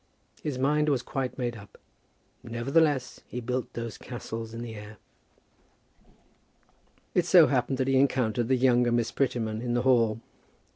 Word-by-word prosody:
His 145 -4 -3
mind 150 +3 +2
was 130 -4 +1
quite 130 -2 -3
made 120 -3 -2
up. 100 -4 -13 0.6
Nevertheless 135 +4 0
he 125 - -5
built 125 +1 -3
those 115 -2 -6
castles 115 -2 -6
in 115 +1 -6
the 115 -2 -7
air. 105 0 -10 2.2
It - - +2
so - - +8
happened 135 - 0
that 130 0 0
he 135 0 +3
encountered 125 -4 +1
the 130 - +3
younger 125 -1 +3
Miss 120 -1 +1
Prettyman 115 -5 -1
in 120 -1 -2
the 120 - +1
hall. 115 -4 +3
120 Hz, 150 wpm, -28 LUFS, 115-130 Hz, 2.2 s, so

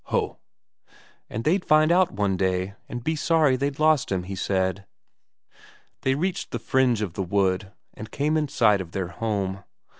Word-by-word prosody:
"Ho!" - - -1 0.9
"And 110 - -4
they'd 180 +7 +2
find 155 +1 +4
out 180 +1 +4
one 100 -1 0
day, 95 +1 -1 0.2
and 120 -1 -5
be 160 +4 0
sorry 155 -3 +3
they'd 140 +2 -2
lost 155 -6 +3
him, 95 -2 0
he 95 +2 -6
said." 95 0 -1 1.1
They 130 0 +1
reached 180 +5 -2
the - - -3
fringe 125 -5 +1
of 95 -5 -4
the 95 - -3
wood, 95 +1 0 0.2
and 110 - -9
came 150 +6 0
in 155 -1 +1
sight 105 -7 +3
of 85 -2 -9
their 95 -3 -2
home. 100 -3 -3
110 Hz, 175 wpm, -25 LUFS, 95-150 Hz, 1.1 s, find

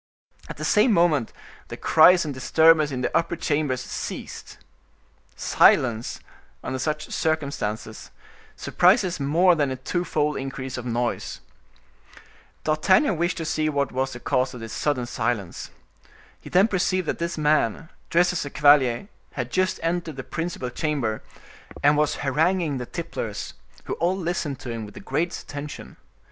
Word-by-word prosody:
At - - -7
the - - -4
same 215 +4 +4
moment 160 - +2 0.4
the - - -8
cries 170 +2 +5
and 145 - -3
disturbance 155 +4 +4
in 130 -3 -4
the 125 - -2
upper 170 +1 +1
chambers 145 -5 -1
ceased. - - -7 0.8
Silence, 120 -2 +3 0.4
under 130 0 -3
such 150 +2 -3
circumstances, 140 -9 -3 0.5
surprises 180 -1 +2
more 165 +6 +4
than 145 -4 +1
a 130 - -3
twofold 150 +1 -1
increase 135 -1 -5
of 125 -1 -6
noise. 120 0 -2 1.2
D'Artagnan 185 - +3
wished 175 +3 -1
to 165 - -4
see 155 0 0
what 140 -2 -1
was 130 +1 -2
the 120 - -8
cause 130 +1 0
of - - -8
this 115 -1 -7
sudden 135 -5 -1
silence. 110 -6 -3 0.7
He - - -11
then 190 +4 +4
perceived 185 -3 0
that - - -2
this 170 0 -3
man, 150 -1 +1 0.2
dressed 175 +1 +3
as 175 - -2
a 140 - -6
cavalier, 145 0 +4 0.3
had 120 -2 -4
just 185 0 0
entered 165 -2 -2
the 135 - -6
principal 165 -7 -4
chamber, 130 -7 -2 0.6
and 145 +1 +5
was 150 0 +1
haranguing 155 +1 +1
the 125 - -6
tipplers, - - -5 0.3
who - - -4
all 175 +3 +1
listened 165 -6 -3
to 125 - -6
him 115 -1 -5
with 105 -1 -11
the - - -8
greatest 160 +6 -2
attention. 145 0 -8
150 Hz, 155 wpm, -24 LUFS, 130-170 Hz, 1.2 s, cries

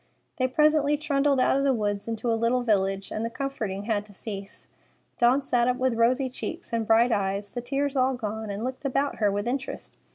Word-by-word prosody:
They 255 - +2
presently 295 +1 +3
trundled 285 -2 +1
out 255 - +3
of - - 0
the 275 -2 +3
woods 205 -2 -2
into 230 +1 -1
a - - +3
little 230 +2 +1
village, 195 -3 0
and 215 - -3
the 230 - -1
comforting 225 -7 -4
had 210 -1 0
to 205 - -15
cease. 200 0 -7 0.5
Dawn 250 +4 +4
sat 245 -2 +2
up 250 0 +1
with 260 -1 +1
rosy 245 +4 +2
cheeks 320 +4 -6
and 225 -2 0
bright 230 +2 +5
eyes, 200 -1 -1
the 245 - -4
tears 275 +3 -1
all 260 0 +2
gone, 220 -2 -4
and 200 +2 -4
looked 255 +3 -4
about 275 +1 0
her 205 -2 +2
with 205 +3 -2
interest. 265 +2 -4
240 Hz, 215 wpm, -26 LUFS, 215-270 Hz, 0.5 s, bright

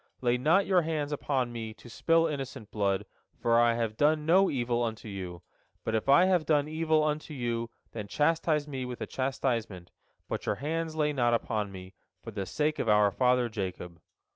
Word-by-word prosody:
Lay 120 -1 +2
not 160 +10 +3
your 185 -2 +4
hands 155 -3 -2
upon 135 -4 -1
me, 110 -2 -6
to - - -15
spill 165 +7 +2
innocent 135 -7 -5
blood, 100 -2 0 0.3
for 115 0 +3
I 120 0 +4
have 115 -2 -2
done 150 +1 +2
no 185 +4 +5
evil 120 -2 0
unto 115 -1 -3
you. 90 -4 -7 0.4
But 110 - -2
if 110 +4 -1
I 170 +6 +7
have 185 -3 +3
done 150 -2 +3
evil 155 0 +1
unto 155 0 -2
you, 120 -2 -2 0.2
then 105 -3 -6
chastise 150 +2 +1
me 135 -3 -4
with 125 -1 -6
a - - -1
chastisement, 115 -8 -2 0.4
but - - -4
your - - +1
hands 160 +3 -3
lay 150 -1 +1
not 120 -3 +2
upon 105 -3 -2
me, 95 0 -10 0.3
for 115 - -7
the 100 -3 -4
sake 150 - -1
of 115 - 0
our 105 -1 +5
father 125 +1 +2
Jacob." 90 -6 -6
125 Hz, 190 wpm, -29 LUFS, 110-150 Hz, 0.4 s, I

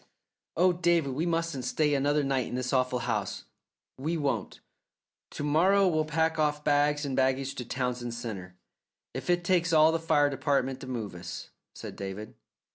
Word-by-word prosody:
"Oh, 180 +2 +5
David, 170 -5 +1
we 160 +6 -1
mustn't 165 -5 -1
stay 150 +4 +1
another 145 +2 +2
night 135 -3 0
in - - -5
this 125 +1 -2
awful 130 -1 +2
house." 105 -5 -2 0.6
"We 160 +5 -1
won't. 140 -9 -2 0.7
To - - -6
morrow 185 +7 +4
we'll 155 -3 +1
pack 160 +1 0
off 150 -1 +1
bag 145 0 +2
and 135 -2 -2
baggage 130 +1 +1
to 125 -3 -6
Townsend 125 -2 -3
Centre, 100 -7 -6 0.6
if - - -6
it 175 0 +2
takes 175 -2 +2
all 155 0 +6
the 165 - 0
fire 145 -3 +3
department 135 -2 0
to - - -9
move 115 -6 -4
us," 85 0 -8 0.2
said - - -8
David. 100 +2 -6
145 Hz, 170 wpm, -29 LUFS, 125-160 Hz, 0.7 s, all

